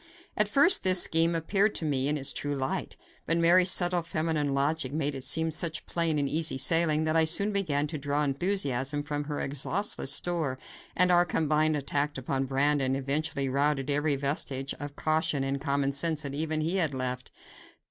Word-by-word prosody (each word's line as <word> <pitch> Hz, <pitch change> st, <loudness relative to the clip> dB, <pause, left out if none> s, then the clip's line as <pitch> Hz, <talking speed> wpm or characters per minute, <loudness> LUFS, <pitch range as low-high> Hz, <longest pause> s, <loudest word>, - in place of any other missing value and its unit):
At 210 Hz, -, +1 dB
first 290 Hz, -, +7 dB
this 185 Hz, -1 st, +6 dB
scheme 165 Hz, +1 st, +2 dB
appeared 195 Hz, +6 st, 0 dB
to 165 Hz, -, -3 dB
me 135 Hz, -3 st, 0 dB
in 150 Hz, +1 st, 0 dB
its 135 Hz, -2 st, +1 dB
true 145 Hz, 0 st, -2 dB
light, 135 Hz, -1 st, -4 dB, 0.3 s
but 165 Hz, -, +1 dB
Mary's 175 Hz, +2 st, +4 dB
subtle 175 Hz, -1 st, +2 dB
feminine 155 Hz, -3 st, -2 dB
logic 140 Hz, 0 st, -1 dB
made 145 Hz, -1 st, -2 dB
it 135 Hz, -1 st, -7 dB
seem 160 Hz, +4 st, +2 dB
such 160 Hz, +1 st, -3 dB
plain 165 Hz, -2 st, -1 dB
and 140 Hz, -1 st, -1 dB
easy 155 Hz, 0 st, 0 dB
sailing 155 Hz, +3 st, +3 dB
that 155 Hz, 0 st, -1 dB
I 165 Hz, -, +4 dB
soon 200 Hz, +6 st, +4 dB
began 155 Hz, -8 st, 0 dB
to 155 Hz, 0 st, -6 dB
draw 145 Hz, +1 st, -2 dB
enthusiasm 145 Hz, -3 st, -1 dB
from 145 Hz, 0 st, -4 dB
her 145 Hz, 0 st, -5 dB
exhaustless 145 Hz, +3 st, -2 dB
store, 155 Hz, -4 st, -1 dB, 0.4 s
and 180 Hz, 0 st, +3 dB
our 175 Hz, 0 st, +4 dB
combined 155 Hz, -2 st, 0 dB
attack 145 Hz, +1 st, -2 dB
upon 135 Hz, +1 st, -3 dB
Brandon 135 Hz, 0 st, 0 dB
eventually 140 Hz, +1 st, -2 dB
routed 140 Hz, +1 st, -1 dB
every 145 Hz, 0 st, 0 dB
vestige 140 Hz, -1 st, -3 dB
of 145 Hz, 0 st, -8 dB
caution 155 Hz, -3 st, -1 dB
and 135 Hz, 0 st, -3 dB
common 140 Hz, -1 st, -1 dB
sense 155 Hz, +2 st, 0 dB
that 140 Hz, -1 st, -6 dB
even 155 Hz, +1 st, -2 dB
he 165 Hz, +5 st, -1 dB
had 160 Hz, -7 st, 0 dB
left. 125 Hz, -1 st, -4 dB
150 Hz, 185 wpm, -27 LUFS, 140-165 Hz, 0.4 s, first